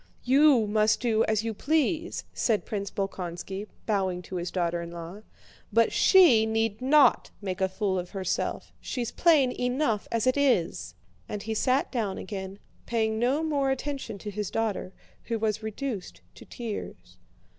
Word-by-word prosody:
"You 270 -2 +5
must 215 +1 +2
do 225 -3 +2
as 215 -1 0
you 225 -1 -2
please," 315 - 0
said 220 -4 0
Prince 200 -2 -3
Bolkónski, 190 +1 -5 0.2
bowing 190 -4 0
to 185 - -6
his 175 0 -3
daughter 175 -2 -1
in 170 - -6
law, 170 +4 -8 0.5
"but 230 0 +3
she 270 - +6
need 225 0 -1
not 285 +3 +4
make 190 -2 -4
a 190 - +2
fool 190 -1 -1
of 180 0 -6
herself, 190 -2 -3
she's 240 -3 -3
plain 300 -7 +4
enough 250 -3 -1
as 230 -2 0
it 255 +2 +2
is." 250 -12 +1 0.3
And 210 -1 -4
he 220 - -3
sat 255 +5 +1
down 215 -7 -2
again, 190 -1 -6 0.3
paying 220 -2 0
no 265 +6 +1
more 285 -4 +1
attention 270 -4 -3
to 210 +1 -7
his 210 -1 -3
daughter, 220 -4 -2 0.3
who 230 - -1
was 215 -1 -1
reduced 220 -2 -5
to - - -14
tears. 230 -4 -7
220 Hz, 160 wpm, -27 LUFS, 195-255 Hz, 0.5 s, she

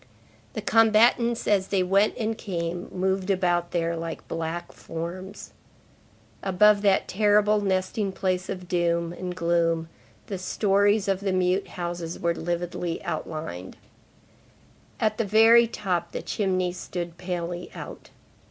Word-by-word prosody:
The 215 - -5
combatants, 225 +2 +4
as 195 -2 +2
they 190 -2 +1
went 195 +3 +2
and 225 0 -1
came, 175 -4 -4
moved 190 +1 -1
about 175 -3 +1
there 170 -1 -1
like 165 0 -6
black 165 +1 -4
forms. 180 +4 -7 0.9
Above 200 +2 +4
that 200 -2 +3
terrible 210 +1 +3
nesting 195 +1 0
place 185 -1 -2
of 180 -1 -5
gloom 170 -1 0 0.4
the 195 -3 -5
stories 205 +2 +2
of 195 -1 +1
the 200 -1 -1
mute 185 +1 +1
houses 175 -1 -4
were 170 0 +1
lividly 175 0 -3
outlined; 95 - -5 1.2
at 215 0 0
the - - +3
very 225 +3 +6
top, 180 -6 -2
the - - -4
chimneys 185 -3 -1
stood 175 -2 -6
palely 175 -1 -4
out. - - -9
185 Hz, 125 wpm, -26 LUFS, 170-205 Hz, 1.2 s, very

